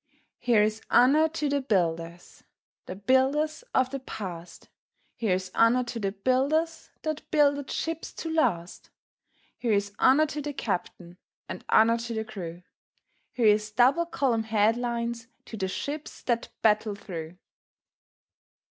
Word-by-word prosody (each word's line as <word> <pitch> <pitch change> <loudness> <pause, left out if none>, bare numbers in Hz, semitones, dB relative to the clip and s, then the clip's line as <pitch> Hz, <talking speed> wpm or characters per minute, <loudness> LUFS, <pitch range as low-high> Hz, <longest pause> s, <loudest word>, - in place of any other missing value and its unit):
Here's 220 -2 +2
honour 300 +6 +5
to 305 -2 -2
the 285 0 0
builders 170 -7 -2 0.2
– - - -71
The 180 - -5
builders 265 - +1
of 260 0 +2
the 275 - -3
past; 180 -9 -8 0.5
Here's 185 -4 -1
honour 235 +2 +4
to 240 -1 -5
the 195 -2 -1
builders 275 +10 0
That 310 -1 -4
builded 285 -2 +2
ships 325 0 -3
to 325 -1 -5
last; 180 - -1 0.7
Here's 205 -4 0
honour 280 +4 +5
to 300 -1 -5
the 290 0 -4
captain, 180 -6 -4 0.3
And - - -7
honour 230 +1 +5
to 230 0 -5
the 220 0 -2
crew; 175 -4 -8 0.7
Here's 215 -3 +3
double 260 +10 +3
column 245 -9 0
headlines 235 +2 0 0.2
To - - -8
the 190 -3 -2
ships 290 +10 -5
that 235 -2 -1
battle 215 -1 +2
through. 170 -3 -8
235 Hz, 130 wpm, -27 LUFS, 200-280 Hz, 0.7 s, honour